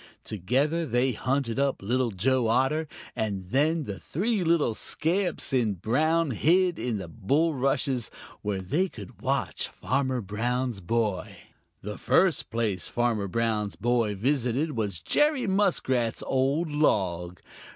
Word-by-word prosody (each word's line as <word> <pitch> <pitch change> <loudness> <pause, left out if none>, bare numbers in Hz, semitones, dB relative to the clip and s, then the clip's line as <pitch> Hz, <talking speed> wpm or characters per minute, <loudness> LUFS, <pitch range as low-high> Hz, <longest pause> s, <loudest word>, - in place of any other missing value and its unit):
Together 135 - 0
they 130 -2 +1
hunted 130 0 -1
up 140 -1 +1
Little 120 +5 0
Joe 115 +5 +1
Otter, 135 +7 +2 0.3
and 100 -4 -3
then 155 +5 +2
the 100 - -6
three 200 - -1
little 165 -8 +2
scamps 170 - -1
in 115 -6 +2
brown 155 - +1
hid 175 - +3
in 120 -3 -1
the 95 -3 -6
bulrushes, 135 - 0 0.3
where 100 -2 -2
they 155 - 0
could 100 - -11
watch - - -1
Farmer 130 -1 -1
Brown's 120 +3 -2
boy. 105 0 -1 0.5
The 105 +1 -6
first 185 -6 +2
place 110 -5 -1
Farmer 115 -4 0
Brown's 105 0 -1
boy 115 -3 +1
visited 130 +6 0
was 100 -6 -2
Jerry 295 - +2
Muskrat's 175 - +1
old 140 +5 +1
log. 90 - 0
125 Hz, 130 wpm, -27 LUFS, 105-150 Hz, 0.5 s, hid